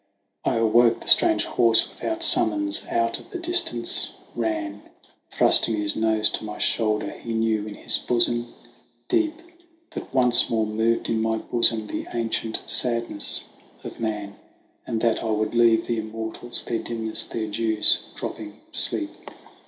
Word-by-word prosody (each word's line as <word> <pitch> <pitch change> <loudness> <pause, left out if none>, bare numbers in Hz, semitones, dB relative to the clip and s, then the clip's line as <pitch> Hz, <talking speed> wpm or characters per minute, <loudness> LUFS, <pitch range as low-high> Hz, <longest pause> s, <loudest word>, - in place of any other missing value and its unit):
T - - 0
awoke: 115 +1 +2
the - - -13
strange - - +6
horse 115 -2 +5
without 330 0 -5
summons 105 - +3
out 115 0 -1
of - - -17
the - - -6
distance 340 - +2 0.2
ran, 105 -3 -4 0.5
Thrusting 115 - +3
his 105 -1 -2
nose 110 -1 +2
to - - -5
my 105 -1 -7
shoulder; 110 -2 -1
he 115 - -8
knew 110 -1 -1
in 105 - -8
his - - -2
bosom 120 0 0 0.6
deep 320 -1 0 0.6
That - - -9
once 125 -2 +3
more 110 -1 0
moved 110 +2 -1
in 110 -1 -1
my 110 0 -1
bosom 115 -1 0
the - - -6
ancient 115 -1 -3
sadness 115 -4 +1 0.4
of - - -10
man, 105 -3 -5 0.5
And 110 - -3
that 115 -2 0
I 115 - -3
would 110 +1 -2
leave 115 -1 +3
the 115 -1 -2
immortals, 110 +2 -5
their 115 -1 -3
dimness, 110 -2 -3
their 110 -2 -5
clews 110 0 +1 0.2
dropping - - -8
sleep. - - +3
115 Hz, 150 wpm, -23 LUFS, 110-115 Hz, 0.6 s, strange